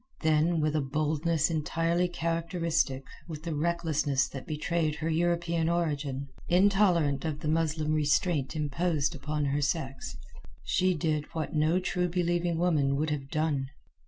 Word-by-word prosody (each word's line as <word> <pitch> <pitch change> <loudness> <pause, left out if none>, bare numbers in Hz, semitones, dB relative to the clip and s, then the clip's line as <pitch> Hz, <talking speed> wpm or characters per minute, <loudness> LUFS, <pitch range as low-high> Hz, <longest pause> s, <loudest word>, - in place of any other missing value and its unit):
Then, 160 +1 +2
with 155 0 0
a 155 - +2
boldness 155 +3 0
entirely 165 +3 +1
characteristic, 165 -5 -1 0.2
with 155 -2 -7
the 165 -1 -3
recklessness 150 -4 +1
that 135 - -8
betrayed 155 0 -1
her 160 +2 -3
European 170 0 +1
origin, 145 -5 -1 0.2
intolerant 180 -7 +3
of 155 -2 -3
the - - -3
Muslim 155 -1 +1
restraint 150 0 +1
imposed 155 +1 0
upon 150 0 -2
her 140 +1 0
sex, 140 -2 -2 0.5
she 185 0 +2
did 155 -1 0
what 160 -2 -3
no 155 +3 +2
True 180 -1 -1
believing 175 -1 0
woman 155 -6 +2
would 155 +2 0
have 135 -2 -3
done. 155 -4 0
155 Hz, 140 wpm, -29 LUFS, 150-170 Hz, 0.5 s, intolerant